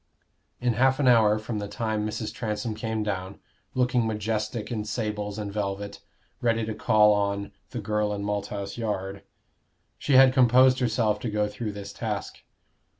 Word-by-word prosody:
In 125 Hz, -1 st, +1 dB
half 130 Hz, +4 st, +3 dB
an 140 Hz, -, +2 dB
hour 110 Hz, -3 st, +5 dB
from 110 Hz, 0 st, -4 dB
that 100 Hz, -1 st, -5 dB
time 105 Hz, 0 st, -2 dB
Mrs. 110 Hz, 0 st, -4 dB
Transome 110 Hz, 0 st, -3 dB
came 110 Hz, 0 st, -3 dB
down, 95 Hz, -2 st, -4 dB, 0.4 s
looking 125 Hz, -2 st, +2 dB
majestic 110 Hz, +1 st, -2 dB
in 110 Hz, -3 st, -2 dB
sables 105 Hz, -1 st, -3 dB
and 105 Hz, -2 st, -5 dB
velvet, 100 Hz, -1 st, -3 dB, 0.4 s
ready 115 Hz, -2 st, +1 dB
to 110 Hz, -, -3 dB
call 105 Hz, 0 st, +4 dB
on 100 Hz, 0 st, -1 dB, 0.2 s
"the -, -, -5 dB
girl 105 Hz, -1 st, 0 dB
in 100 Hz, -1 st, -3 dB
Malthouse 100 Hz, 0 st, -3 dB
Yard." 100 Hz, -3 st, -3 dB, 0.8 s
She 145 Hz, -, 0 dB
had 130 Hz, 0 st, +8 dB
composed 130 Hz, 0 st, +5 dB
herself 110 Hz, -4 st, +1 dB
to 115 Hz, -, -3 dB
go 105 Hz, 0 st, 0 dB
through 105 Hz, 0 st, -5 dB
this 100 Hz, 0 st, -8 dB
task. 105 Hz, -3 st, -4 dB
105 Hz, 160 wpm, -26 LUFS, 105-115 Hz, 0.8 s, had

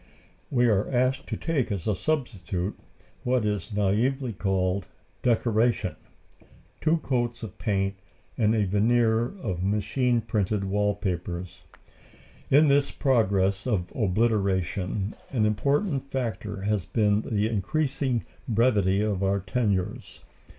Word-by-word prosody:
We 125 Hz, -3 st, +3 dB
are 105 Hz, -4 st, +2 dB
asked 130 Hz, +1 st, +1 dB
to -, -, -3 dB
take 135 Hz, -9 st, -1 dB
as 95 Hz, -4 st, -3 dB
a 110 Hz, -, +2 dB
substitute, 100 Hz, -, -2 dB, 0.5 s
what 125 Hz, -3 st, +1 dB
is 105 Hz, +1 st, -1 dB
naïvely 110 Hz, +5 st, 0 dB
called 95 Hz, -1 st, 0 dB, 0.3 s
"decoration," 115 Hz, -4 st, +1 dB, 0.9 s
two 160 Hz, +1 st, +3 dB
coats 120 Hz, -6 st, -2 dB
of 110 Hz, -, -8 dB
paint, 100 Hz, -3 st, 0 dB, 0.4 s
and 110 Hz, -1 st, +2 dB
a 105 Hz, -2 st, +2 dB
veneer 110 Hz, +3 st, +3 dB, 0.2 s
of 90 Hz, -6 st, -3 dB
machine 110 Hz, +5 st, +1 dB
printed 105 Hz, -2 st, -1 dB
wall 105 Hz, +1 st, +1 dB
papers. 90 Hz, -2 st, -4 dB, 0.9 s
In 150 Hz, +3 st, +6 dB
this 140 Hz, 0 st, +3 dB
progress 100 Hz, -6 st, +1 dB
of 95 Hz, -7 st, -1 dB
obliteration 100 Hz, -2 st, 0 dB, 0.2 s
an 115 Hz, -5 st, +1 dB
important 140 Hz, -, 0 dB
factor 110 Hz, -6 st, -3 dB
has 105 Hz, -2 st, 0 dB
been 105 Hz, -2 st, +2 dB
the 105 Hz, -1 st, 0 dB
increasing 130 Hz, -, -1 dB, 0.2 s
brevity 105 Hz, -4 st, +3 dB
of 105 Hz, -3 st, 0 dB
our 100 Hz, +1 st, +2 dB
tenures. 100 Hz, -2 st, -2 dB
105 Hz, 120 wpm, -26 LUFS, 95-125 Hz, 0.9 s, In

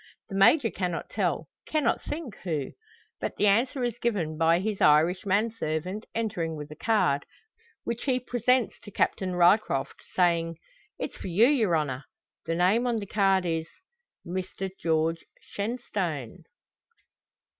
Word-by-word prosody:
The 195 Hz, -, -5 dB
Major 225 Hz, +5 st, +5 dB
cannot 180 Hz, -3 st, -3 dB
tell -, -, -1 dB, 0.2 s
cannot 310 Hz, -2 st, +1 dB
think 295 Hz, -, -5 dB
who. 155 Hz, -7 st, -3 dB, 0.5 s
But -, -, -3 dB
the -, -, +1 dB
answer 245 Hz, +6 st, +2 dB
is 240 Hz, -1 st, -2 dB
given 185 Hz, -10 st, -1 dB
by 165 Hz, +2 st, +3 dB
his 205 Hz, +1 st, -2 dB
Irish 160 Hz, +6 st, +4 dB
manservant 200 Hz, -2 st, -1 dB
entering 200 Hz, -8 st, -2 dB
with 150 Hz, 0 st, -8 dB
a -, -, -8 dB
card, 205 Hz, -11 st, +2 dB, 0.6 s
which 235 Hz, 0 st, -4 dB
he 255 Hz, -2 st, +2 dB
presents 245 Hz, 0 st, +1 dB
to 205 Hz, -, -12 dB
Captain 185 Hz, -2 st, 0 dB
Ryecroft, 175 Hz, -5 st, +3 dB
saying: 170 Hz, -2 st, +2 dB, 0.4 s
"It's -, -, -5 dB
for -, -, -6 dB
you, 190 Hz, +6 st, +5 dB
yer 235 Hz, -, +3 dB
honner." 145 Hz, -3 st, -2 dB, 0.4 s
The 165 Hz, -, 0 dB
name 195 Hz, +8 st, +3 dB
on 235 Hz, -2 st, +1 dB
the 205 Hz, -, -4 dB
card 195 Hz, -2 st, +2 dB
is 165 Hz, -1 st, -1 dB, 0.6 s
"Mr 185 Hz, +2 st, -4 dB
George 165 Hz, 0 st, +1 dB, 0.2 s
Shenstone." 200 Hz, -, -4 dB
190 Hz, 140 wpm, -27 LUFS, 165-225 Hz, 0.6 s, Major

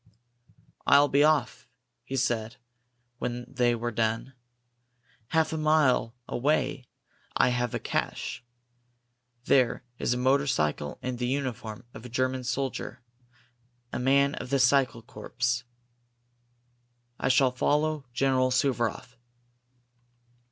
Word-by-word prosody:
"I'll 145 Hz, 0 st, +6 dB
be 140 Hz, +1 st, +4 dB
off," 150 Hz, -4 st, +1 dB, 0.4 s
he 130 Hz, +2 st, -5 dB
said, 115 Hz, -3 st, -1 dB, 0.6 s
when 120 Hz, 0 st, -3 dB
they 125 Hz, -2 st, +1 dB
had 120 Hz, 0 st, -3 dB
done. 115 Hz, +3 st, -1 dB, 0.9 s
"Half 160 Hz, +2 st, +1 dB
a -, -, -1 dB
mile 150 Hz, -6 st, +2 dB
away 135 Hz, -1 st, 0 dB, 0.5 s
I -, -, +4 dB
have 120 Hz, -1 st, -1 dB
a -, -, -1 dB
cache. -, -, -3 dB, 1.0 s
There 125 Hz, -2 st, +3 dB, 0.2 s
is 125 Hz, -, +1 dB
a -, -, -2 dB
motorcycle 125 Hz, -, +1 dB
and 125 Hz, -1 st, -3 dB
the 125 Hz, -, -1 dB
uniform 125 Hz, -4 st, -3 dB
of -, -, -10 dB
a 125 Hz, -, -9 dB
German 130 Hz, +1 st, -1 dB
soldier 130 Hz, -1 st, -3 dB, 0.9 s
a -, -, -2 dB
man 140 Hz, +2 st, +3 dB
of -, -, -6 dB
the 140 Hz, -, +2 dB
cycle 130 Hz, -3 st, +3 dB
corps. 120 Hz, +3 st, -3 dB, 1.5 s
I -, -, 0 dB
shall 130 Hz, 0 st, +4 dB
follow 150 Hz, +3 st, 0 dB
General 130 Hz, 0 st, +2 dB
Suvaroff." 125 Hz, -2 st, -1 dB
125 Hz, 115 wpm, -28 LUFS, 120-140 Hz, 1.5 s, I'll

